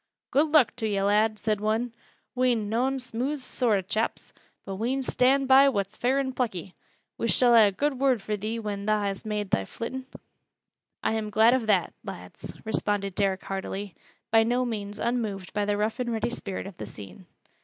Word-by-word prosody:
"Good 290 +4 +4
luck 300 -5 +4
to 225 -3 -1
yo', 200 -2 0
lad!" 215 +2 +3
said 215 -1 -1
one. 220 +3 0 0.4
"We'n 245 -5 +1
noan 255 +5 +1
smooth 255 +3 -2
soart 250 -4 0
o' - - -1
chaps, 215 +5 -2 0.3
but 195 -1 -5
we'n 255 +5 -1
stand 265 +2 +2
by 270 +1 +7
what's 200 -4 -2
fair 255 +4 +1
an' 265 -1 -1
plucky. 195 -8 -3 0.5
We 230 - 0
shall 245 0 +5
ha' 225 -3 +8
a - - 0
good 270 +6 -1
word 265 -3 +3
fur 210 +1 -3
thee 215 +3 -3
when 205 -2 -4
tha 215 - +4
hast 205 0 -2
made 210 -2 -2
thy 95 - +2
flittin'." 255 - -6 1.0
"I'm 220 -1 0
glad 220 +3 +5
of 250 -4 0
that, 190 -5 +2
lads," 90 -2 -9
responded 205 -2 -1
Derrick 195 -1 0
heartily, 195 0 -5 0.4
by 225 0 +6
no 245 +3 +1
means 205 -3 -4
unmoved 215 -6 -2
by 205 -1 0
the 205 0 0
rough 215 +4 -1
and 245 -1 -1
ready 225 +1 -1
spirit 195 -6 -5
of 195 -2 -9
the 105 - -6
scene. 100 -4 -11
220 Hz, 190 wpm, -27 LUFS, 200-250 Hz, 1.0 s, ha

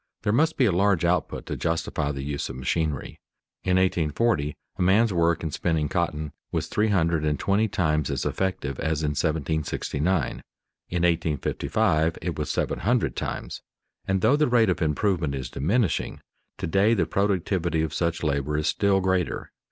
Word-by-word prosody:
There 105 -1 +1
must 160 +6 +2
be 130 - +4
a 105 - +3
large 90 -1 +2
output 90 +1 0
to - - -4
justify 80 -3 -1
the 70 -1 -5
use 70 0 -3
of 65 - -6
machinery. 70 +2 -2 0.4
In 95 0 +2
1840 85 -2 +1 0.2
a - - 0
man's 100 +4 +4
work 85 -1 +2
in 80 - -2
spinning 80 -1 0
cotton 75 -4 -1 0.2
was - - -1
three 105 +1 0
hundred 85 -6 +1
and 75 -1 +1
twenty 100 +3 +2
times 75 -8 0
as - - -2
effective 90 -8 -2
as 80 -1 -1
in 75 - +1
1769, 80 +2 0
in - - -3 0.7
1855 80 -1 +1
it 85 -1 -3
was 75 -2 -3
seven - - -1
hundred - - +1
times; - - -4 0.5
and 95 -1 +1
though 115 +8 +4
the 150 0 +2
rate 120 -4 +4
of 90 - -3
improvement 80 -1 0
is 65 -1 -5
diminishing, 100 - 0 0.4
to - - -3
day 100 +7 +3
the 100 - +2
productivity 90 -4 0
of 80 -1 -3
such 85 +1 -1
labor 75 0 0
is 75 - -1
still 100 -1 +2
greater. 95 -1 -1
85 Hz, 170 wpm, -25 LUFS, 75-95 Hz, 0.7 s, be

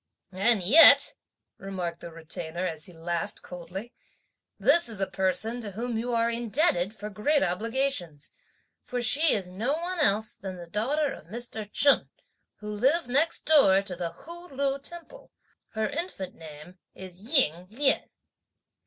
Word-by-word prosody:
"And 200 +1 +1
yet," 285 - +7 0.5
remarked 180 -3 -5
the 170 - -9
Retainer, 165 +2 -5
as 160 -3 -5
he - - -13
laughed 170 +4 -5
coldly, 180 +6 -9 0.7
"this 340 -7 +5
is 215 -3 -5
a 195 - +1
person 190 +6 0
to 205 -3 -7
whom 235 +3 -4
you 235 +2 -3
are 230 0 +2
indebted 230 - 0
for 210 0 -8
great 280 +9 +1
obligations; 190 - -2 0.5
for 250 - -5
she 290 +6 +5
is 195 -4 -3
no 215 +10 -2
one 345 +3 -4
else 220 -6 +2
than 190 -1 -7
the 175 - -9
daughter 270 - -1
of - - -13
Mr. 220 0 -5
Chen, 285 -1 +4 0.5
who 210 0 -6
lived 260 +7 +1
next 295 +6 +2
door 200 -11 +5
to 190 -2 -6
the 170 -1 -3
Hu 345 - -12
Lu 275 -1 -2
temple. 345 - -11 0.4
Her 220 -1 -1
infant 290 - -5
name 160 +3 -13 0.2
is 185 -1 -10
'Ying 190 - +1
Lien.'" 270 +5 +1
215 Hz, 155 wpm, -27 LUFS, 180-275 Hz, 0.7 s, yet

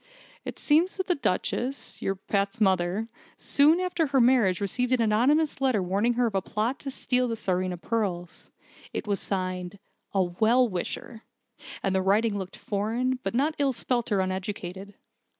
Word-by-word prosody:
It - - -6
seems 325 +6 +2
that 375 - -1
the 365 - +2
Duchess 265 - -2
your 195 - -1
Pat's 200 +3 -2
mother 190 +1 +1 0.3
soon 300 +5 +4
after 355 -3 0
her 270 -1 +2
marriage 235 -7 +4
received 250 +6 -1
an 255 - +3
anonymous 265 +8 +2
letter 255 -8 +2
warning 200 +6 +1
her 245 +1 +1
of 225 - -1
a 195 - +1
plot 220 +7 -2
to 275 - -6
steal 250 -1 0
the 230 - -2
Tsarina 185 -3 -1
pearls. 180 -6 -3 0.4
It - - -3
was 205 -2 -1
signed 185 0 -3 0.4
'A 190 - +4
Well 220 +8 +3
Wisher', 220 +3 -5 0.6
and 195 - +1
the 190 - +2
writing 205 +3 +2
looked 190 -2 -5
foreign, 230 +5 -1
but 235 - -3
not 290 +5 +2
ill 275 -2 +2
spelt 240 -1 -1
or 200 -2 +3
uneducated. 190 +1 -4
220 Hz, 170 wpm, -27 LUFS, 190-255 Hz, 0.6 s, soon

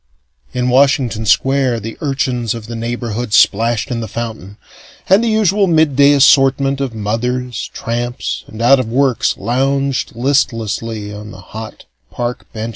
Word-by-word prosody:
In 125 0 -1
Washington 125 -4 +2
Square, 135 -3 +2
the 110 +2 -6
urchins 130 -5 -1
of 115 -2 -8
the 115 +1 -7
neighborhood 120 -1 -4
splashed 115 +4 +2
in 120 - -2
the 110 - -5
fountain, 110 -3 -6 0.5
and 195 +5 +4
the - - 0
usual 205 -2 +2
midday 145 -4 +4
assortment 135 0 +4
of 130 -4 -3
mothers, 120 +3 -3
tramps 120 +2 -4
and 110 +1 -7
out 135 +3 +6
of 130 - -2
works 130 0 +1
lounged 135 +2 -1
listlessly 115 -4 -1
on 105 +1 -9
the 95 - -11
hot 110 0 -8 0.2
park 120 0 -5
benches. 110 +1 -5
120 Hz, 145 wpm, -16 LUFS, 115-135 Hz, 0.5 s, out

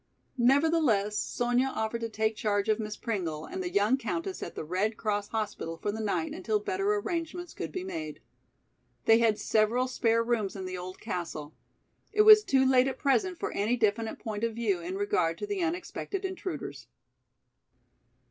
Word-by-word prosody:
Nevertheless, 260 -6 +3
Sonya 245 +4 +1
offered 220 +1 -2
to 230 - -2
take 220 0 0
charge 205 -1 0
of 215 +1 +2
Miss 215 -1 -4
Pringle 170 -9 -3
and 370 - -5
the 360 - -2
young 215 0 +3
countess 340 +6 -3
at - - -6
the - - -4
Red 190 +7 -1
Cross 205 -2 -1
hospital 205 -7 -3
for 205 - -2
the 220 +2 -4
night 220 +9 -1
until 370 +6 0
better 395 0 0
arrangements 350 -3 -3
could - - -5
be 370 - -4
made. 155 - -5 0.9
They 225 +1 +6
had 225 -2 +3
several 225 +4 +2
spare 230 -2 +2
rooms 225 -5 -1
in 190 -1 -5
the 185 0 -4
old 180 +1 -7
castle. 170 -7 -5 0.6
It 425 0 +4
was 430 0 +9
too 265 -6 +3
late 260 0 +5
at 265 -1 -3
present 355 +6 +1
for - - -2
any 220 +5 0
definite 220 0 0
point 215 -1 -5
of 230 -1 0
view 215 -6 0
in 175 +2 -5
regard 180 -4 +1
to - - -4
the 405 -2 -2
unexpected 360 +3 -3
intruders. 300 - -5
230 Hz, 175 wpm, -29 LUFS, 205-325 Hz, 0.9 s, was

